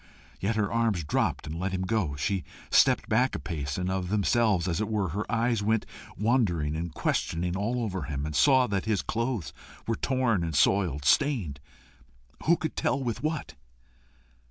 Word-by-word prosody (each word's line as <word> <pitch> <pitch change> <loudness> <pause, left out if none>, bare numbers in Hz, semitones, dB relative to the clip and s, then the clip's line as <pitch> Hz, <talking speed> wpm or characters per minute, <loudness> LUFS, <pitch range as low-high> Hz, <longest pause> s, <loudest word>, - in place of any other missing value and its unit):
Yet 105 +3 0
her 105 -2 0
arms 115 -7 +1
dropped 75 - 0
and 80 +2 -5
let 95 +1 -2
him 95 0 -1
go. 95 -8 0
She 90 +6 -1 0.3
stepped - - +4
back 125 +4 +2
a - - -3
pace, 75 -5 -4
and 90 0 -2
of 95 -1 -2
themselves, 105 -2 +2
as 90 +3 0
it 110 - -1
were, 105 -4 0
her 105 +9 -4
eyes 115 -1 +1
went 110 +1 +1 0.3
wandering 95 - +1
and 85 +1 -3
questioning 85 +3 -1
all 115 +5 -1
over 95 -4 -3
him, 70 0 -3
and 75 -1 -4
saw 130 - +5
that 100 -4 -2
his 110 -3 0
clothes 115 - -2 0.3
were 115 - 0
torn 125 -9 +1
and 80 -2 -3
soiled 75 -3 +2
stained 100 - +2 0.9
who 170 +1 +5
could 160 - -4
tell 140 - 0
with 120 -4 -3
what? 155 -1 -3
100 Hz, 180 wpm, -28 LUFS, 85-115 Hz, 0.9 s, saw